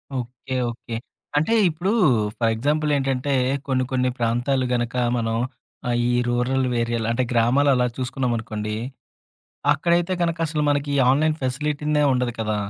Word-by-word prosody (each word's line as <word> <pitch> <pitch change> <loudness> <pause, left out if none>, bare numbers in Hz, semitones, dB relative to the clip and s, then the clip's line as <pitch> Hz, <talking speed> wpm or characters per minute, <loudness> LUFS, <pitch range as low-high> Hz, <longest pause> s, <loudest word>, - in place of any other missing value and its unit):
Okay, 125 +1 -5 0.2
okay. 115 0 -8 0.4
అంటే 155 +9 +2 0.2
ఇప్పుడు 175 +5 -1 0.5
for 115 -1 +2
example 150 +5 0
ఏంటంటే. 135 0 -1 0.3
కొన్ని 130 -1 +1
కొన్ని 130 -1 +1
ప్రాంతాలు 120 +3 +1
గనుక 120 0 -1 0.2
మనం 115 -1 -1 0.5
ఆహ్, 120 - +1
ఈ - - +2 0.2
రూరల్ 125 +2 +1 0.2
ఏరియలు 115 -1 -1
అంటే 125 +2 +1
గ్రామాలు 125 +5 +3
అలా 125 -1 +2
చూసుకున్నామనుకోండి? 115 -5 -2 1.0
అక్కడైతే 170 +4 +1
గనక 170 -1 0
అసలు 150 -1 -1
మనకి 145 0 +1
ఈ - - +1
ఆన్‌లైన్ 155 +4 +2
ఫెసిలిటీనే 150 +3 0
ఉండదు 125 -1 0
కదా! 110 -1 -1
130 Hz, 135 wpm, -23 LUFS, 120-145 Hz, 1.0 s, గ్రామాలు